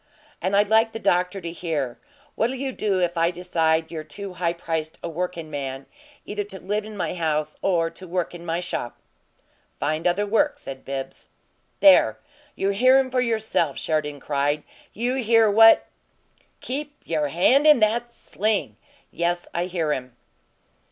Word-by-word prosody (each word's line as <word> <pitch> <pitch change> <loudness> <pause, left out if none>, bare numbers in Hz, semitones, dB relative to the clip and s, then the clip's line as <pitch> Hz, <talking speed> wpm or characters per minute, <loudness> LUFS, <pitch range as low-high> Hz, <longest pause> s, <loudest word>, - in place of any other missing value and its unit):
"And 185 +3 0
I'd 205 +1 +4
like 225 +1 +4
the - - -3
doctor 180 -1 +1
to 170 -1 -5
hear: 155 -8 -3 0.3
What'll 240 +4 0
you 265 +1 -3
do 205 -6 0
if 175 -1 0
I 165 +1 +3
decide 165 -2 0
you're 160 -2 -5
too 185 +6 -7
high 170 -1 -1
priced 160 -2 -4
a - - -2
workin' 170 -1 -4
man 135 -2 -5 0.4
either 205 0 -3
to 195 -1 -9
live 205 +4 -2
in 215 -1 -9
my - - -2
house 155 -3 -1
or 165 -3 +1
work 180 -4 -3
in 175 -1 -9
my 165 0 -2
shop?" 150 -8 -4 0.8
"Find 155 +4 0
other 190 +4 +1
work," 230 +8 +1
said 135 -1 -8
Bibbs. 135 -1 -6 0.5
"There! 290 -2 +6 0.4
You 195 - 0
hear 255 +6 +5
him 265 -1 +1
for 250 0 +2
yourself!" 220 - 0
Sheridan 150 -2 -2
cried. 145 +1 0 0.3
"You 245 +4 -1
hear 225 -3 +4
what 225 +2 +7 0.4
" - - -42 0.3
"Keep 290 +3 -5
you 160 -2 -1
hand 215 - +3
in 300 -4 +7
that 235 +3 +1
sling! 205 - -2 0.3
Yes, 175 +1 -1
I 175 +1 -1
hear 170 -4 -1
him." 125 -3 -6
180 Hz, 165 wpm, -24 LUFS, 160-215 Hz, 0.8 s, what